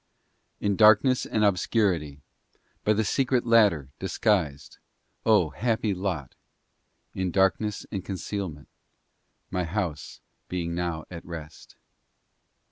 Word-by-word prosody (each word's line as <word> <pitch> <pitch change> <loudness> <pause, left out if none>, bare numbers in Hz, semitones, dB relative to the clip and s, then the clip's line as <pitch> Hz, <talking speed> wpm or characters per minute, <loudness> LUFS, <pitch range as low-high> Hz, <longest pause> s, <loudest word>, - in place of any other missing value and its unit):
II - - -7
In 100 -1 +2
darkness 110 +4 +5
and 105 -1 +1
obscurity, 90 -7 +1 0.6
By 105 - +3
the 110 +1 +1
secret 130 +1 +1
ladder, 105 - +4
disguised, 90 -7 -1 0.5
O, 100 -8 +4
happy 110 - 0
lot! 90 -7 -3 0.8
In 95 -1 -1
darkness 95 +3 +1
and 95 -3 -3
concealment, 95 -5 -5 0.8
My 90 -1 0
house 80 -4 -4 0.3
being 85 -2 -3
now 85 -2 -3
at 85 -2 -8
rest. 80 -2 -10
95 Hz, 110 wpm, -26 LUFS, 80-105 Hz, 0.8 s, darkness